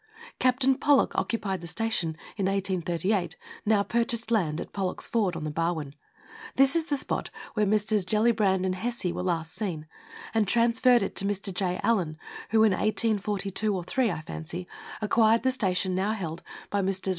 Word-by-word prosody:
Captain 255 +1 +3
Pollock 285 +1 +3
occupied 200 -5 -1
the 170 - -7
station, 175 -6 -1 0.2
in 195 -3 0
1838, 190 - 0 0.3
(now 210 -2 +4
purchased 230 +1 -1
land) 170 -8 +1
at - - -7
Pollock's 190 -2 -1
Ford, 205 -7 0
on 165 - -5
the 155 - -3
Barwon 160 -3 -2 0.6
this 270 +2 +4
is 330 -1 +2
the 290 -3 -1
spot - - -3 0.2
where 210 -1 +1
Messrs. 210 0 +2
Gellibrand 210 -2 +2
and 185 - 0
Hesse 235 +4 -3
were - - -3
last 165 -3 -2
seen 175 -8 -4 0.5
and 220 -2 +2
transferred 240 +1 +4
it 195 - -4
to 195 - +2
Mr. 200 -1 -1
J. 180 -1 -1
Allan, 185 -9 +1 0.3
who, 220 -1 +4
in 220 - +5
1842 205 -1 0
3, 255 +5 +1
I 170 - -3
fancy, 165 +3 -6 0.4
acquired 225 +1 +4
the 260 - +3
station 190 -6 0
now 195 +4 0
held 170 -6 -5 0.3
by 205 - +1
Messrs. 190 0 -1
200 Hz, 170 wpm, -27 LUFS, 180-225 Hz, 0.6 s, in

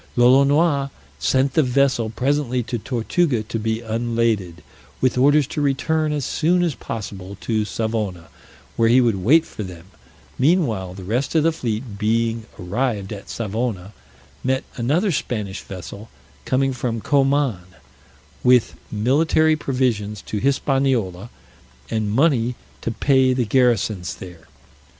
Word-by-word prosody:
Lolonois 140 +4 +4 0.3
sent 130 0 +1
the 160 - +4
vessel 130 -3 +2
presently 130 +1 0
to 120 0 -4
Tortuga 125 - 0
to 110 +1 -4
be 110 +1 -1
unladed, 115 -6 -1 0.4
with 130 -1 +2
orders 145 +3 +4
to 150 - -1
return 155 +2 +1
as 145 -4 -2
soon 175 +3 +1
as 170 -4 0
possible 100 -5 -7
to 110 -2 0
Savona, 105 -7 -3 0.5
where 115 0 +4
he 125 +2 +6
would 115 -5 +2
wait 160 - +5
for - - -8
them: 90 -4 -8 0.5
meanwhile, 125 - +1
the 95 - -9
rest 120 - -2
of 160 - +4
the 165 - +3
fleet 115 -7 -4
being 115 +1 0
arrived 105 +2 -2
at 100 - -10
Savona, 110 -3 -3 0.5
met 130 +1 0
another 155 - +1
Spanish 105 - -3
vessel 100 +3 -9 0.4
coming 135 +1 +1
from 120 -2 -2
Coman, 135 -4 +2 0.8
with 125 -2 +4 0.2
military 155 +8 +3
provisions 120 -8 -1
to 105 - -4
Hispaniola, 130 -7 0 0.6
and 110 -2 -1
money 125 -2 +2 0.3
to - - -2
pay 130 +2 +3
the 125 -2 0
garrisons 110 -6 +1
there. 85 -3 -12
120 Hz, 130 wpm, -21 LUFS, 105-135 Hz, 0.8 s, he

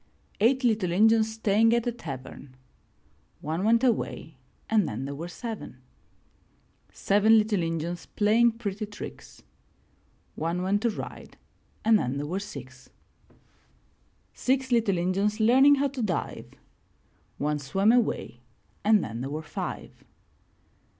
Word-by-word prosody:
Eight 255 +5 +3
little 215 -7 +1
Injuns 220 +3 +4
staying 225 +1 +3
at 235 0 0
a 240 - 0
tavern 135 - -9 0.4
— - - -38
One 165 +4 -1
went 230 +3 +3
away 215 - -1 0.3
and 215 -5 +2
then 115 +5 -4
there 140 - -5
were 160 +5 -6
seven. 220 - -7 1.1
Seven 210 +3 +4
little 210 -3 +1
Injuns 165 +1 -3
playing 225 +3 +3
pretty 215 -2 -5
tricks 205 - -10 0.4
— - - -39
One 175 +2 -1
went 200 +2 +1
to 235 - +2
ride 215 - -8 0.5
and 220 -1 +5
then 125 -2 -2
there 145 - -3
were 180 +6 -3
six. 130 -10 -10 1.4
Six 260 0 0
little 225 -6 +2
Injuns 195 +5 0
learning 265 +6 +6
how 280 0 0
to 265 -2 -5
dive 195 -6 -3 0.5
— - - -39
One 150 0 0
swam 195 +10 +2
away 225 - 0 0.4
and 210 -2 +4
then 115 +2 -5
there 135 - -4
were 155 +2 -5
five. - - -6
205 Hz, 135 wpm, -27 LUFS, 165-225 Hz, 1.4 s, learning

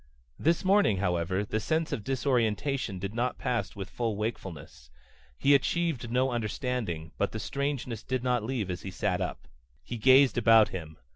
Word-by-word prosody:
This 165 +4 +1
morning, 195 - +4
however, 95 +1 0
the 110 - -1
sense 160 +7 -1
of 105 - -3
disorientation 125 -3 0
did 100 +3 -5
not 120 +2 -1
pass 120 -1 -2
with 95 -2 -5
full 115 -3 -2
wakefulness. 95 - -6 0.5
He 140 - +4
achieved 140 -4 +1
no 130 +2 +1
understanding, 110 - -3
but 100 - 0
the 110 - -3
strangeness 135 -3 -3
did 130 -1 -3
not 125 -2 +1
leave 110 -6 -2
as 90 - -5
he - - -6
sat - - -1
up. - - -4 0.4
He 120 - -5
gazed 130 +4 +5
about 115 -2 +6
him. 80 -4 -7
115 Hz, 165 wpm, -29 LUFS, 100-130 Hz, 0.5 s, about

